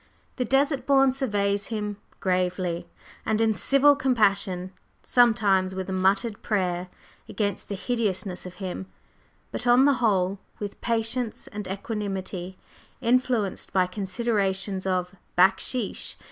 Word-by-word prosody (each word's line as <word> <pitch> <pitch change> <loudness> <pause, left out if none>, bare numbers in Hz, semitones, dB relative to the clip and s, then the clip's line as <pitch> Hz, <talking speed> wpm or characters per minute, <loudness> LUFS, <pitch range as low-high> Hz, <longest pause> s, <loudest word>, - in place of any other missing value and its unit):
The 250 - 0
Desert 275 +3 +1
Born 270 -1 +5
surveys 205 -6 0
him 210 -2 -3 0.2
gravely 180 -2 -1 0.4
and 220 0 0
in 225 -1 +3
civil 275 +8 +4
compassion, 200 -8 +1 0.3
sometimes 205 -6 +3
with 190 -1 -4
a - - -2
muttered 195 +4 +1
prayer 180 -4 -1 0.4
against 200 -3 -2
the 200 - -2
hideousness 195 -5 -2
of 180 - -10
him, 190 -1 -5 0.6
but - - -3
on 245 +2 +6
the 285 - +5
whole 195 -3 +2 0.2
with 205 -1 -6
patience 230 0 -1
and 210 -2 -7
equanimity, 190 -2 -4 0.4
influenced 245 -4 0
by 185 -1 +4
considerations 195 -1 -1
of 180 0 -1 0.2
"backsheesh." 190 +5 +1
200 Hz, 120 wpm, -26 LUFS, 185-235 Hz, 0.6 s, on